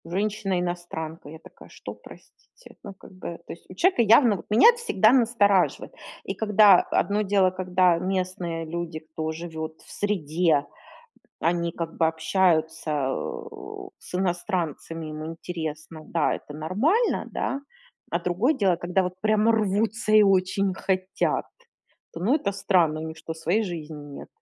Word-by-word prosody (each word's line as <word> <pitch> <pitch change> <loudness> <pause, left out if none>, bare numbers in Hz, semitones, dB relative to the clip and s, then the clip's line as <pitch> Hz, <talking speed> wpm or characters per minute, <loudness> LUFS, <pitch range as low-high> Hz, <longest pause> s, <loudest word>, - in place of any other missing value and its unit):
Женщина-иностранка. 175 -5 -3
Я 160 - -9
такая: - - -16
"Что, - - -9
простите?" - - -17
Ну, 200 - -8
как 190 - -16
бы, 180 -2 -7
то - - -7
есть 170 - -16
у 185 - -11
человека 360 - +3
явно 230 -1 +5
вот - - -11
меня 220 - +7
это 480 0 +1
всегда 215 - +3
настораживает. 225 -7 +2 0.3
И - - -4
когда, 210 -3 +6
одно 205 +3 0
дело, 195 -2 +3
когда 185 -1 +2
местные 180 -3 -2
люди, 165 0 -5
кто 155 0 -5
живет 160 -1 -7
в - - -16
среде, 165 -6 +1 0.8
они 170 0 0
как 165 -1 -5
бы 165 - +4
общаются, 160 -1 +1 0.2
э, 430 - -6
с - - -13
иностранцами, 175 -3 -2
им 155 0 -6
интересно, 160 -1 -6
да, 170 - +1
это 145 - -9
нормально, 235 - +1
да. 275 - -2 0.5
А - - +1
другое 200 - +1
дело, 190 - +2
когда 180 +3 0
вот 180 0 -3
прямо 215 +1 +3
рвутся 215 +1 0
и 215 0 +8
очень 195 0 +2
хотят, 185 0 -1 0.7
то, 165 - -8
ну, 215 +10 +2
это 215 -10 0
странно. 175 -5 +2
У - - -5
них 160 - -8
что, 160 0 -6
своей 170 +7 0
жизни 160 -4 -6 0.2
нет? - - -10
185 Hz, 150 wpm, -25 LUFS, 165-210 Hz, 0.8 s, и